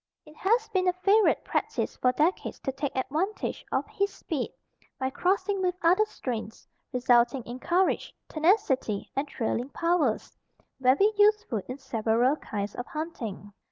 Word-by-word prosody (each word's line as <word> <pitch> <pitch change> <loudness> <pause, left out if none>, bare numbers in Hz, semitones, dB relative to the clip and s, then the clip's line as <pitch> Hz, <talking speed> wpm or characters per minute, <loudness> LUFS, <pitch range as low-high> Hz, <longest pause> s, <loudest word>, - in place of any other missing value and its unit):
] - - -63
It 300 0 -15
has 445 +4 +2
been 375 -3 +1
a 360 - +4
favorite 395 +4 +3
practice - - -2
for 250 - +2
decades 310 +8 0
to 270 - -2
take 275 +1 -4
advantage 315 +10 -2
of - - 0
his 400 0 -1
speed, 295 -7 -4 0.5
by 260 0 -2
crossing 380 +5 0
with 365 -1 +1
other 365 +6 +5
strains, 230 - -6 0.2
resulting 245 0 +3
in 240 +2 -7
courage, 355 +6 +1 0.2
tenacity 310 - +1
and 275 +2 -1
trailing 245 0 -2
powers, 335 -8 0 0.4
very 275 +12 +4
useful 415 - +3
in 255 - -5
several 240 0 +1
kinds 205 -5 -4
of 245 - -6
hunting. 230 - -6
290 Hz, 150 wpm, -28 LUFS, 250-375 Hz, 0.5 s, other